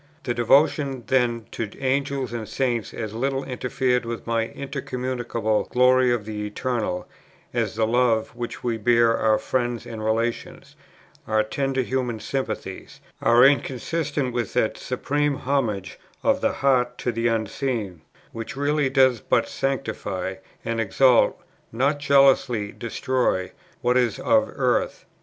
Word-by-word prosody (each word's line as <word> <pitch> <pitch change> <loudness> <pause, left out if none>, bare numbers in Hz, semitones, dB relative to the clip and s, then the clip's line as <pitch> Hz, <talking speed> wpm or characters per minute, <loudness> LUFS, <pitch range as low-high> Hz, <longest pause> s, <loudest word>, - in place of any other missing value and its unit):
The 120 - -1
devotions 135 +2 +2
then 120 -3 +1
to 115 -3 -4
Angels 135 -1 -1
and 115 -3 -5
Saints 120 -5 -1
as 110 -2 -5
little 135 +3 -1
interfered 125 0 -1
with 115 0 -5
the 115 - -1 0.2
incommunicable 125 -5 -2
glory 125 0 +4
of 120 -4 -1
the 105 -1 -4
Eternal, 105 -4 -2 0.5
as - - -1
the 110 0 +2
love 115 -1 +2
which 120 -1 -6
we 115 -2 0
bear 115 +1 +4
our 110 -1 +3
friends 120 -2 -2
and 115 -2 -7
relations, 115 +2 -2 0.5
our 110 0 +2
tender 135 +4 -1
human 125 -3 -2
sympathies, 110 -8 -5 0.2
are 120 +2 +6
inconsistent 140 +1 0
with 120 -4 -2
that 110 - +1
supreme 145 +3 -1
homage 120 -9 -2 0.2
of - - +2
the - - +2
heart 130 -3 +1
to 120 - -1
the 115 0 0
Unseen, 110 - -2 0.3
which 115 +3 -6
really 145 0 +1
does 130 -2 +4
but - - +1
sanctify 100 -9 -3 0.3
and 115 0 -1
exalt, 125 +4 +4 0.3
not 140 +5 +1
jealously 135 -7 +3
destroy, 120 -5 -1 0.3
what 125 +1 +2
is 125 -3 +1
of 275 -1 +2
earth. - - 0
120 Hz, 135 wpm, -24 LUFS, 115-135 Hz, 0.5 s, are